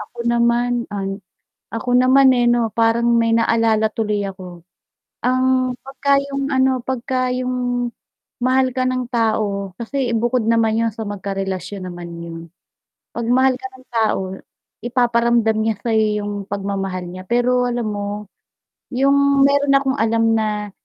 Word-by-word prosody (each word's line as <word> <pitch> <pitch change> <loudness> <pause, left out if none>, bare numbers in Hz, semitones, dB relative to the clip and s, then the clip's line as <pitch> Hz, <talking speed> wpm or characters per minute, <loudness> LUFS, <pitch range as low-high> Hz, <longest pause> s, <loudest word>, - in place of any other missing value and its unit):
Ako 210 +3 -11
naman 235 0 +1
an 195 -1 -4 0.5
ako 230 +2 -3
naman, 260 +1 +6
eh, 245 -2 +3
ano, 240 -1 +2
parang 230 +1 +2
may 230 0 +2
naalala 225 -1 +2
tuloy 210 -2 -1
ako. 180 -3 -9 0.6
Ang 255 0 +2
'pagka 275 +1 +1
'yong, 275 0 -4
ano, 260 0 +3
'pagka 255 0 -1
'yong 250 -1 -1 0.5
mahal 260 +1 +3
ka 255 - +1
ng 255 -1 -1
tao 215 -5 -1
kasi 255 +1 -2
ibukod 240 +1 +1
naman 225 -1 +2
'yon 230 0 +1
sa 220 0 -6
magkarelasyon 195 -1 -4
naman 175 -1 -8
'yon. 170 -1 -7 0.8
'Pag 235 - -3
mahal 260 +1 +4
ka 260 0 -7
ng 260 0 -16
tao, 225 -4 +1 0.6
ipaparamdam 235 -2 +2
niya 220 -1 +1
sa 235 - -3
'yo 215 -1 +2
'yong 205 0 -4 0.2
pagmamahal 195 -2 -3
niya. 185 +1 -8
Pero, 245 +3 +2
alam 240 -2 -2
mo, 205 -1 -3 0.9
'yong 280 +1 +4
mayro'n 280 0 +3
akong 275 0 +1
alam 225 0 +2
na 210 -1 -2
235 Hz, 145 wpm, -20 LUFS, 210-255 Hz, 0.9 s, naman